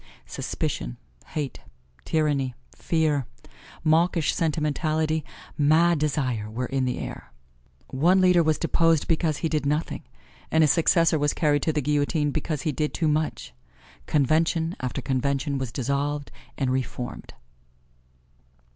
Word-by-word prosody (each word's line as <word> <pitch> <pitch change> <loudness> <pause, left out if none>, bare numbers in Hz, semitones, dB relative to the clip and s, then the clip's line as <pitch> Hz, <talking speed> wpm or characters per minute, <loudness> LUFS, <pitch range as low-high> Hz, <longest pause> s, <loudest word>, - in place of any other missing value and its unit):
Suspicion, - - -4 0.3
hate, 150 -4 -4 0.5
tyranny, 145 -5 0 0.2
fear, 155 -6 0 0.6
mawkish 165 0 +3
sentimentality, 155 0 0 0.4
mad 160 +3 +4
desire, 130 -8 -1
were 120 +4 -3
in 135 +1 -1
the 125 - -1
air. - - -7 0.6
One 175 +8 +3
leader 180 -2 +5
was 155 -1 +2
deposed 165 -2 +2
because 160 -2 +1
he 165 - -1
did 155 -2 -1
nothing, 150 +3 -1 0.5
and 160 0 +4
his 150 - +5
successor 165 -1 +3
was 145 0 +1
carried 145 -2 +2
to 160 - +1
the 150 -2 -1
guillotine 145 +1 +1
because 155 -1 -3
he 155 - 0
did 150 +1 -2
too 165 - +1
much. 155 - -1 0.5
Convention 160 +3 +2
after 125 -1 -3
convention 140 +1 0
was 130 -3 -3
dissolved 140 +3 -2 0.3
and 135 -3 0
re 130 +1 +2
formed. 125 -1 -7
150 Hz, 130 wpm, -25 LUFS, 140-160 Hz, 0.6 s, leader